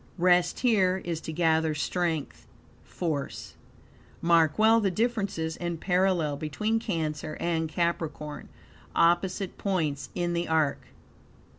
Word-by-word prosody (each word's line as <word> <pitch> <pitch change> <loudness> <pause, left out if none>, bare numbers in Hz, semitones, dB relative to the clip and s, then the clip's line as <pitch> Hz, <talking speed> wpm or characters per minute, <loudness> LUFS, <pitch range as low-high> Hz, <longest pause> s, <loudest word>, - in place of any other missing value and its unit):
Rest 180 0 +3
here, 195 -7 +3
is 165 -2 -3
to - - -6
gather 160 -1 +2
strength, 165 -1 -2 0.4
force. 155 -6 -4 0.7
Mark 165 -3 +3
well 220 +1 +5
the 200 - +2
difference 215 -1 -1
and 165 +1 -3
parallel 180 -5 +1
between 210 +10 -1
Cancer 155 -7 -3
and 165 -2 -1
Capricorn, 160 -3 -3 0.5
opposite 180 +3 +1
points 155 -8 -1
in 175 -1 -1
the 170 0 -1
arc. 160 -3 +1
170 Hz, 115 wpm, -27 LUFS, 160-185 Hz, 0.7 s, well